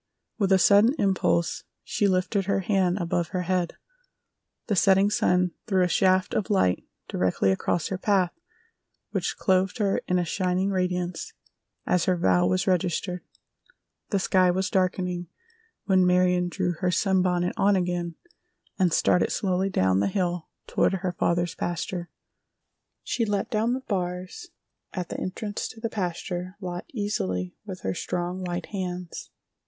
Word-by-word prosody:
With 200 -2 +2
a 190 - +7
sudden 205 - +5
impulse 170 -4 +1 0.2
she 205 - +1
lifted 190 +1 +1
her 195 0 +1
hand 190 -1 +1
above 170 -2 -1
her 185 0 -2
head. 180 -1 -1 0.9
The 210 - 0
setting 195 +2 +4
sun 180 -3 +2 0.2
threw 190 -4 +3
a - - +3
shaft 185 +1 +2
of 200 - -1
light 95 - +2 0.2
directly 95 +1 +1
across 155 - 0
her 190 - -3
path 190 -3 +2 0.8
which - - -2
clothed 190 +2 +2
her 200 -3 +1
in 180 - +2
a 175 - +1
shining 185 +2 0
radiance 180 -2 -2 0.5
as 175 -2 +2
her 185 -1 +2
vow 90 - +3
was 95 0 +1
registered. 180 0 0 0.9
The 200 - +1
sky 185 -1 +3
was 185 +2 0
darkening 180 -2 0 0.6
when 190 -2 +4
Marion 180 0 +3
drew 180 0 -1
her 185 - +1
sunbonnet 180 -1 +1
on 200 +1 +3
again 175 -2 -1 0.6
and 180 -2 +3
started 180 - +3
slowly 190 0 0
down 95 - +2
the 100 - +2
hill 175 - -1 0.2
toward - - +1
her 190 -1 -1
father's 175 0 0
pasture. 175 0 -3 0.9
She 235 - -1
let 205 -2 -1
down 225 +2 +1
the 260 - -2
bars 180 - -4 0.5
at 180 -2 -4
the - - -4
entrance 205 +3 -4
to 225 - -11
the 230 0 -2
pasture 180 -1 -3
lot 180 -2 -5
easily 95 - -2
with 185 -2 -7
her 95 - -1
strong, 180 - -3
white 175 -1 -3
hands. 180 -3 -5
180 Hz, 150 wpm, -26 LUFS, 175-195 Hz, 0.9 s, a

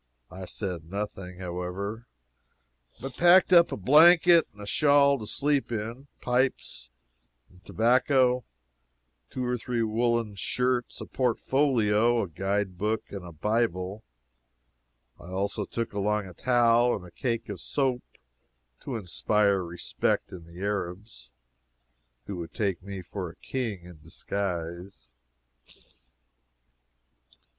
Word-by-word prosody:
I 95 0 -8
said 90 -4 -5
nothing, 95 -2 -5
however, 95 +5 -5 0.9
but 130 +1 -7
packed 180 +2 +6
up 170 -1 +7
a - - -3
blanket 165 - +6
and 105 - -22
a 105 - -7
shawl 140 +3 +4
to 105 - -7
sleep 145 0 0
in, 115 +5 -5
pipes 125 - -1 0.6
and 90 +1 -21
tobacco, 125 +2 +2 0.9
two 130 - -4
or 125 0 -1
three 120 0 -1
woollen 115 0 0
shirts, 125 +4 -2
a - - -5
portfolio, 120 -3 +1
a - - -4
guide 95 +2 -2
book, 110 +2 -2
and 100 -2 -6
a 90 - -9
Bible. 100 +1 -1 1.2
I 85 - -12
also 100 +3 -2
took 115 +1 -4
along 105 0 0
a 90 - -10
towel 120 +2 +3
and 90 - -8
a 90 - -13
cake 115 +5 -3
of 100 -5 -6
soap, 130 -3 0 0.8
to 130 - -6
inspire 100 0 +1
respect 85 0 -2
in 85 -3 -10
the 85 +2 -12
Arabs, 95 - -4 1.0
who 100 - -6
would 85 -1 -8
take 100 -6 -1
me 95 0 -7
for 90 +1 -6
a - - -13
king 115 -9 -4
in 90 -3 -13
disguise. 85 -5 -5
105 Hz, 125 wpm, -27 LUFS, 90-125 Hz, 1.2 s, up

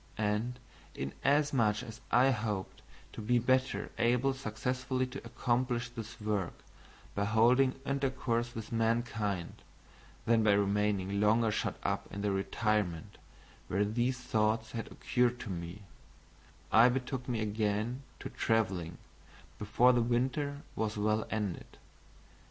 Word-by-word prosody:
And, 110 +4 -1 0.4
inasmuch 120 - +1
as 115 +2 -9
I 130 +3 +5
hoped 105 -5 -3 0.3
to - - -6
be 120 +3 +2
better 130 -4 +1
able 125 +3 +3
successfully 130 +1 -2
to 130 +2 -8
accomplish 120 0 -1
this 115 -2 -8
work 105 -4 -1 0.6
by 100 - 0
holding 125 +5 +4
intercourse 130 -4 -1
with 110 -1 -6
mankind, 115 -5 -1 0.6
than 115 -1 +4
by 105 -2 +5
remaining 100 -1 +1
longer 110 +1 +4
shut 105 - -1
up - - -2
in 100 - -5
the 105 - +1
retirement 95 -3 -1 0.5
where 100 +2 +1
these 120 +4 0
thoughts 110 -2 0
had 115 -1 -5
occurred 125 0 +1
to 115 -5 -5
me, 85 +3 -6 0.9
I 115 +3 +7
betook 125 0 -3
me 120 -3 0
again 110 +3 -1 0.2
to - - -5
traveling 95 -7 0 0.6
before 120 +4 +4
the 120 - +3
winter 135 +5 0
was 110 -1 -2
well 110 +1 +1
ended. 105 -5 -4
115 Hz, 125 wpm, -32 LUFS, 105-125 Hz, 0.9 s, I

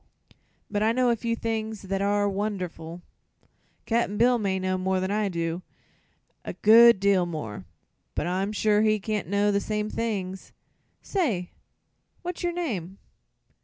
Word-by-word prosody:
But 205 - 0
I 220 +1 +3
know 250 0 +3
a - - +2
few 230 +1 -2
things 220 -2 -3
that 195 0 -2
are 205 0 +2
wonderful. 180 -4 -4 0.8
Cap'n 225 -3 0
Bill 240 +2 +4
may 195 -3 0
know 185 0 -1
more'n 185 +1 0
I 210 -1 +1
do 170 0 -2 0.8
a - - -5
good 230 0 +7
deal 195 -3 +3
more 110 - -6 0.5
but - - -1
I'm 190 +3 -1
sure 210 0 +2
he 215 -1 +3
can't 210 -3 -3
know 200 +2 +2
the 200 - +2
same 210 0 -2
things. 195 -5 -4 0.5
Say, 230 - -1 0.7
what's 355 0 -5
your 350 -1 0
name?" 205 - -4
205 Hz, 145 wpm, -26 LUFS, 185-220 Hz, 0.8 s, good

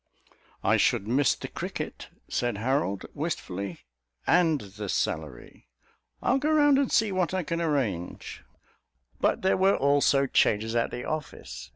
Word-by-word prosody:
"I - - +4
should 100 - +2
miss 135 +4 +3
the - - -7
cricket," - - -6 0.2
said 120 -4 -1
Harold 115 -4 -1
wistfully, 100 - -4 0.4
"and 165 -4 +3
the 100 0 -7
salary. 75 -9 -3 0.6
I'll 270 - +3
go 295 +3 0
round 290 -3 +4
see 215 -2 +3
what 185 -1 0
I 185 - 0
can 170 +1 -2
arrange." 125 - -2 0.8
But - - +1
there 190 - +3
were 190 +1 +4
also 140 0 +3
changes 110 -3 +2
at 115 - +1
the 125 - -6
office. 105 - -6
140 Hz, 140 wpm, -27 LUFS, -, 0.8 s, I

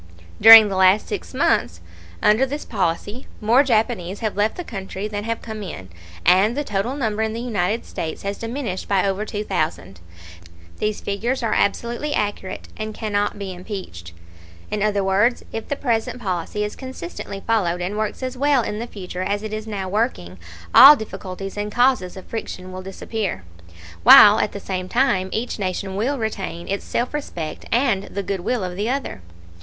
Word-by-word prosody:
During 225 0 +11
the 195 - -3
last 190 +2 +4
six - - -5
months 85 +1 +1 0.4
under 215 +5 +4
this 285 +3 -3
policy 190 +7 -2
more 235 +5 +4
Japanese 220 -7 0
have 215 -2 -2
left 210 +2 0
the 355 - -4
country 195 - -6
than 205 0 -5
have 230 0 -3
come 220 -2 -6
in, 95 - -8 0.4
and 205 +7 +4
the 290 - 0
total 210 +2 -2
number 220 -6 -1
in 220 0 -1
the 230 - -4
United 220 -2 -1
States 160 -1 -5
has 200 0 -4
diminished 230 -5 -4
by 195 -2 +2
over 195 +2 -1
two 210 0 -4
thousand. 95 - -3 0.8
These 210 0 -2
figures 235 +6 -2
are 225 - 0
absolutely 235 +8 0
accurate 205 -2 -3
and 215 0 -5
cannot 205 -2 -1
be 195 -2 -5
impeached. 180 - -8 0.6
In 210 - -2
other 205 -1 +1
words, 200 +6 +2
if 225 - -5
the 285 - -1
present 240 -2 -1
policy 195 0 -3
is 210 - -4
consistently 200 -6 -7
followed 180 -6 +1
and 180 +3 -3
works 215 +4 -3
as 255 0 -3
well 280 -1 +2
in 210 0 -4
the 235 - -4
future 185 -4 -7
as 205 +2 -2
it 215 0 -5
is 215 0 -5
now 200 -3 -4
working, 185 - -2 0.3
all 285 +2 +11
difficulties 195 -4 -7
and 205 0 -3
causes 245 -7 +2
of 190 - -10
friction 185 -5 -6
will 185 0 -7
disappear, 195 - -4 0.6
while 210 - +9
at - - 0
the 200 - -7
same 185 -2 -4
time 205 -7 +1
each 230 0 -3
nation 190 0 -3
will 250 +8 0
retain 195 -6 -4
its 200 +1 -3
self 245 +4 -2
respect 170 - -5
and 230 -6 +2
the 200 - -5
good 195 0 -3
will 225 +4 -1
of 180 -1 -4
the 205 +5 -2
other. 270 - -3
210 Hz, 180 wpm, -21 LUFS, 190-230 Hz, 0.8 s, During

